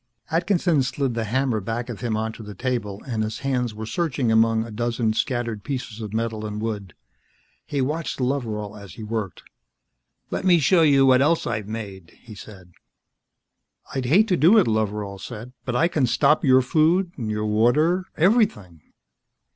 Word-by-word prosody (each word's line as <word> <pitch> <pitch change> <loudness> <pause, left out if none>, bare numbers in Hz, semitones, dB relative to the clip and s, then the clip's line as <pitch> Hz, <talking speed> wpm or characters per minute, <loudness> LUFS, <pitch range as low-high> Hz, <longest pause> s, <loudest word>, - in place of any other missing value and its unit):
Atkinson 170 -2 +2
slid 135 0 -1
the 115 -1 -2
hammer 125 0 0
back 115 +4 -4
of 120 -4 -7
him 115 -3 -1
onto 110 +1 -4
the 105 -1 -9
table, 105 -3 -3
and 115 -4 -2
his 110 +1 -3
hands 125 -4 -1
were 110 +1 -6
searching 140 -3 -1
among 110 0 +3
a 115 - -9
dozen 115 0 -1
scattered 120 -3 -2
pieces 125 -5 -5
of 105 -2 -6
metal 110 -1 -2
and 105 0 -4
wood. 105 -6 -4 0.7
He 140 - -1
watched 155 +4 -2
Loveral 115 -6 -2
as 100 -5 -11
he 110 - -8
worked. 105 -3 -4 0.9
"Let - - -2
me 180 -2 +5
show 165 +3 +4
you 140 -4 +5
what 130 0 +5
else 160 +4 +2
I've 105 -2 -3
made," 100 -5 -8
he 115 - -11
said. 95 -3 -13 1.2
"I'd 130 -1 -2
hate 190 - +4
to 180 - +2
do 175 +10 +6
it," 210 - +5
Loveral 105 -2 -2
said, 120 +3 -8
"but 125 - -2
I 165 +7 +3
can 150 -7 +1
stop 150 +5 +3
your 130 -2 +5
food, 165 +7 +2
your 110 -3 -3
water, 150 - +2
everything." 160 - +1
120 Hz, 170 wpm, -23 LUFS, 110-140 Hz, 1.2 s, do